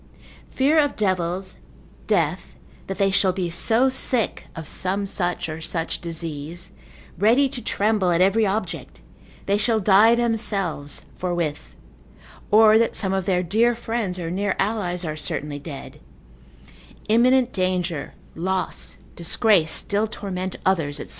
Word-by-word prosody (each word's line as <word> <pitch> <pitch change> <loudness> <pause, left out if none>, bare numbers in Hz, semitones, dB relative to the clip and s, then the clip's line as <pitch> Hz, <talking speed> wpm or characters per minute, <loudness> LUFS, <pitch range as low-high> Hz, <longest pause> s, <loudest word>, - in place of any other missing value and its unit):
Fear 290 +4 +2
of 290 -2 +1
devils, 185 -2 -1 0.5
death, - - 0 0.3
that 195 - -4
they 195 -1 +2
shall 190 -1 +2
be 180 -2 -3
so 225 +9 +2
sick, 255 -3 0
of 165 -3 -7
some 195 +4 -1
such 175 -3 -2
or 160 0 -6
such 165 0 -3
disease, 165 +1 -6 0.5
ready 235 +8 +4
to 255 -2 -7
tremble 210 -4 +1
at 170 -1 +2
every 195 +4 +3
object, 210 +2 -3 0.4
they 200 +1 +1
shall 225 +1 +1
die 215 +3 +5
themselves 205 -11 0
forthwith, 175 -5 -3 0.7
or 215 +1 +6
that 230 - +1
some 190 -2 +2
of 190 -2 -1
their 180 -1 +1
dear 225 +7 +2
friends 225 -5 -3
or 170 -2 -4
near 200 +2 -1
allies 185 -4 -1
are 155 -1 -3
certainly 150 -1 -4
dead; 140 -1 -9 1.1
imminent 245 +3 +3
danger, 180 -4 -2 0.2
loss, 185 +2 -3 0.2
disgrace 175 0 +2
still 205 +6 0
torment 185 -3 -5
others, 160 -7 +1
&c. - - -6
190 Hz, 135 wpm, -23 LUFS, 175-220 Hz, 1.1 s, or